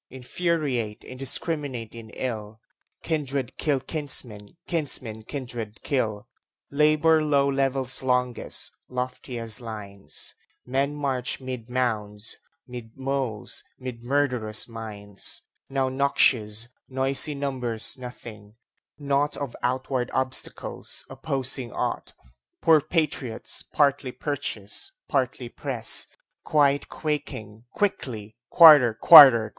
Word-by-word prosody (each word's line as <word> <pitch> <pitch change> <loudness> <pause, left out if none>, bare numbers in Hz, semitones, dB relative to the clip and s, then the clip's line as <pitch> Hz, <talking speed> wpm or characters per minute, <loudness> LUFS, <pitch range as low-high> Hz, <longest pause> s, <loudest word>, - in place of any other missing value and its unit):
Infuriate, 130 -5 -2
indiscrminate 130 -2 -2
in 115 -1 -10
ill, 110 -3 -5 0.4
Kindred 140 -5 -2
kill 145 -3 +1
kinsmen, 130 -6 -3
kinsmen 130 -9 -3
kindred 120 -3 -7
kill. 110 -7 -1 0.4
Labor 155 +2 +4
low 140 -2 +3
levels 135 -1 0
longest, 125 -1 +1 0.2
lofiest 125 -2 -4
lines; 105 -4 -6 0.3
Men 135 +3 -1
march 135 -4 -2
'mid 130 -3 -7
mounds, 110 -4 -2 0.3
'mid 120 -2 -10
moles, 130 -6 -3
' - - -45
mid 125 -2 -7
murderous 125 -5 0
mines; 105 -3 -4 0.3
Now 135 -1 0
noxious, 120 -5 +2 0.2
noisey 135 +3 +3
numbers 130 -5 -1
nothing, 115 -4 -10 0.4
naught 145 0 0
Of 140 -4 -5
outward 130 0 -1
obstacles, 130 0 -2
opposing 135 -2 -2
ought; - - -3 0.5
Poor 160 -2 +6
patriots, 150 -7 -2
partly 140 -2 +1
purchased, 125 - -4
partly 130 -2 -1
pressed, 120 -2 +2 0.4
Quite 145 -2 +2
quaking, 120 -8 -5
quickly 115 - -2
"Quarter! 150 -9 +8
Quarter!" 130 -6 +10
130 Hz, 95 wpm, -25 LUFS, 115-140 Hz, 0.5 s, Quarter